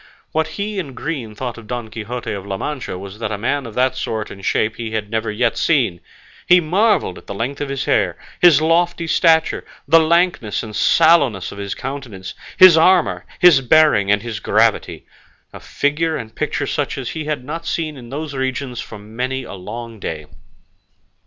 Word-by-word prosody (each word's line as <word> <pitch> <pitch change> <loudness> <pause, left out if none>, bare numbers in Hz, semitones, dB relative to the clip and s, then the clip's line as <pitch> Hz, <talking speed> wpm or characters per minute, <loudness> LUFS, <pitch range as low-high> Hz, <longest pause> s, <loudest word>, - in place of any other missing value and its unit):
What 160 0 -2
he 205 0 -3
in 140 -8 -6
green 130 -9 -5
thought 120 0 -5
of 110 - -14
Don 120 -1 -4
Quixote 115 +2 -5
of 100 -2 -5
La 95 -1 -3
Mancha 135 -6 -4
was 100 +2 -9
that 110 -2 -3
a 105 - -2
man 130 +5 -1
of 110 - -11
that 130 +1 +2
sort 110 -2 -4
and 95 - -11
shape 110 +3 0
he 115 -2 -4
had 105 -1 -3
never 110 -1 -1
yet 115 +2 0
seen; 120 - +1 0.5
he 180 0 +7
marvelled 185 - +1
at - - -21
the - - -6
length 130 +7 -3
of 145 - -3
his 140 -1 -3
hair, - - +1 0.2
his 155 -4 +6
lofty 170 +1 +2
stature, 160 0 +3 0.2
the 165 - +7
lankness 165 - +1
and 110 -2 -8
sallowness 140 - +3
of 100 - -9
his 100 -1 -4
countenance, 125 -9 -7 0.2
his 185 -3 +9
armour, 180 +1 +3
his 175 -6 +6
bearing 135 -7 +4
and 105 0 +2
his 115 -3 -5
gravity - - +1 0.5
a - - -9
figure 155 +2 -1
and 115 -5 -8
picture - - -2
such - - -2
as - - -4
had 150 -4 -4
not 165 +4 -4
been - - -12
seen 155 -3 -2
in 120 -3 -11
those 145 +2 -5
regions 130 -1 -3
for 110 - -9
many 125 +6 -4
a - - -9
long 115 +4 -8
day. 80 -5 -5
130 Hz, 190 wpm, -19 LUFS, 110-160 Hz, 0.5 s, his